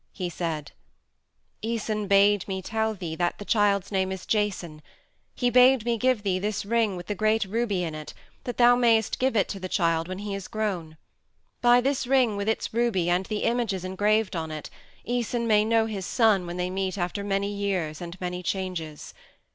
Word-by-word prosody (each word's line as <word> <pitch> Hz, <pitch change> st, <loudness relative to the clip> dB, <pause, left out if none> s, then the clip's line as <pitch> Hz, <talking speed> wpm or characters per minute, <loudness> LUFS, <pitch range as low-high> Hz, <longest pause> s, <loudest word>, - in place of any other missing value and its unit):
He 180 Hz, -2 st, -4 dB
said: 160 Hz, -4 st, -4 dB, 0.9 s
"Æson 215 Hz, -2 st, -2 dB
bade 200 Hz, 0 st, +4 dB
me 190 Hz, -1 st, -4 dB
tell 220 Hz, +2 st, -1 dB
thee 175 Hz, -5 st, -5 dB
that 175 Hz, -1 st, 0 dB
the 205 Hz, -, -8 dB
child's 200 Hz, -3 st, +2 dB
name 190 Hz, -1 st, 0 dB
is 190 Hz, -1 st, -6 dB
Jason. 185 Hz, -7 st, -1 dB, 0.5 s
He 245 Hz, -1 st, +1 dB
bade 250 Hz, -1 st, +6 dB
me 235 Hz, -1 st, +1 dB
give 255 Hz, -4 st, +2 dB
thee 185 Hz, -2 st, 0 dB
this 205 Hz, +1 st, -2 dB
ring 225 Hz, -2 st, +1 dB
with 175 Hz, -, -7 dB
the 205 Hz, -, -2 dB
great 215 Hz, +2 st, +1 dB
ruby 205 Hz, -2 st, -1 dB
in 165 Hz, -2 st, -3 dB
it 155 Hz, 0 st, -8 dB, 0.3 s
that 245 Hz, -, -4 dB
thou 245 Hz, 0 st, +6 dB
mayst 230 Hz, -3 st, +2 dB
give 260 Hz, -1 st, +1 dB
it 200 Hz, -, +3 dB
to 195 Hz, -, -5 dB
the 185 Hz, 0 st, -5 dB
child 165 Hz, -3 st, +1 dB
when 185 Hz, 0 st, -5 dB
he 205 Hz, 0 st, -5 dB
is 195 Hz, -1 st, -5 dB
grown. 185 Hz, -8 st, -3 dB, 0.6 s
By 245 Hz, 0 st, +6 dB
this 270 Hz, -1 st, 0 dB
ring 255 Hz, -5 st, +3 dB
with 200 Hz, +1 st, -1 dB
its 220 Hz, -, -2 dB
ruby 215 Hz, -7 st, +1 dB
and 180 Hz, +2 st, +1 dB
the 215 Hz, -1 st, -2 dB
images 225 Hz, -6 st, 0 dB
engraved 205 Hz, +2 st, +1 dB
on 160 Hz, -1 st, -3 dB
it 155 Hz, -1 st, -7 dB, 0.4 s
Æson 240 Hz, 0 st, -1 dB
may 210 Hz, -2 st, +4 dB
know 225 Hz, 0 st, +2 dB
his 200 Hz, -4 st, -4 dB
son 215 Hz, -7 st, +3 dB
when 175 Hz, +1 st, -5 dB
they 180 Hz, 0 st, -2 dB
meet 190 Hz, +1 st, -2 dB
after 180 Hz, +3 st, -2 dB
many 200 Hz, 0 st, -1 dB
years 185 Hz, -7 st, -2 dB
and 175 Hz, +1 st, -7 dB
many 180 Hz, 0 st, -4 dB
changes. 180 Hz, -5 st, -4 dB
200 Hz, 195 wpm, -26 LUFS, 180-225 Hz, 0.9 s, bade